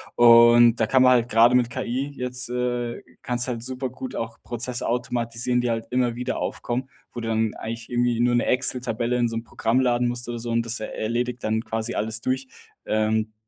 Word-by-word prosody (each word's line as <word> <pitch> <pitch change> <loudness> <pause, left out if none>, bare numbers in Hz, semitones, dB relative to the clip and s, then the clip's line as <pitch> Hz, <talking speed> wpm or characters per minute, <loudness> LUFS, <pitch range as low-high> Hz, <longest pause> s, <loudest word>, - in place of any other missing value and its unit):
Und 120 0 +7
da 110 - +3
kann 130 +2 +3
man 130 0 +6
halt 120 -1 +2
gerade 115 +2 +5
mit 120 -1 +2
KI 130 +5 -3
jetzt 125 -1 -3
äh, 120 -1 -2 0.2
kannst 125 +1 -1
du - - -1
halt 115 -1 -7
supergut 130 0 -5
auch 115 0 -5
Prozesse 120 +1 -4
automatisieren, 120 0 -1
die 120 -1 0
halt 115 0 -3
immer 125 -1 +1
wieder 125 +1 -3
aufkommen, 125 +2 -3 0.2
wo 120 - -6
du 115 - -4
dann 110 -1 0
eigentlich 115 0 -6
irgendwie 120 -1 +1
nur 120 0 +3
'ne 120 - +2
Excel-Tabelle 125 -2 0
in 120 -1 +2
so 115 - -5
'nem 115 - -3
Programm 115 +2 0
laden 125 -1 +2
musst 120 0 -4
oder 120 - -3
so 115 +1 -5
und 115 0 +1
das 115 +2 -2
erledigt 120 +3 -3
dann 110 +1 0
quasi 110 +1 -3
alles 110 +1 -2
durch. 130 0 -2 0.4
Ähm, 110 0 0
120 Hz, 205 wpm, -24 LUFS, 115-125 Hz, 0.4 s, Und